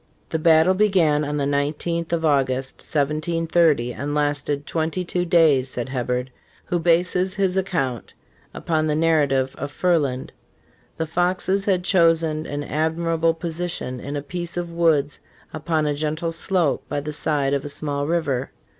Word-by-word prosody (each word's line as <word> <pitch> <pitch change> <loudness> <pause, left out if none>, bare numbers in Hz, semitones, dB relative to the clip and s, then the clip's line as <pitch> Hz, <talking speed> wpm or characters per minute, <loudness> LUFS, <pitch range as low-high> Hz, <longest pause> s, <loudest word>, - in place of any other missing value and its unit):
"The 160 - -1
battle 160 +2 +5
began 185 -7 +3
on 150 0 -2
the 140 - 0
igth 150 +4 -1
of 165 -1 0
August, 135 -3 +1
1730, 155 -2 +1
and 145 +4 -4
lasted 145 -1 -1
twenty 165 +3 -2
two 180 +1 -1
days," 155 -7 +4
says 125 0 -4
Hebberd,| 125 0 -2 0.4
who 175 - -1
bases 180 +3 +2
his 190 -2 0
account 165 - -2 0.4
upon 155 -1 -1
the 150 - +1
narrative 145 -5 +2
of 140 - -3
Ferland.^ 145 -5 0 0.3
" - - -35
The 160 - -1
Foxes 185 +4 0
had 185 -3 +1
chosen 165 -4 +2
an 145 0 -4
admirable 165 +2 0
position 165 -6 -4
in 140 +4 -6
a 145 - -3
piece 175 +3 -5
of 175 -1 -3
woods 160 -4 +1 0.3
upon 155 0 -1
a 150 - +1
gentle 155 +3 -2
slope 165 -2 0
by 145 - -1
the 150 +1 -5
side 145 -2 0
of 140 -1 0
a 145 - -5
small 145 0 -2
river. 145 -6 -1
155 Hz, 155 wpm, -22 LUFS, 145-170 Hz, 0.4 s, battle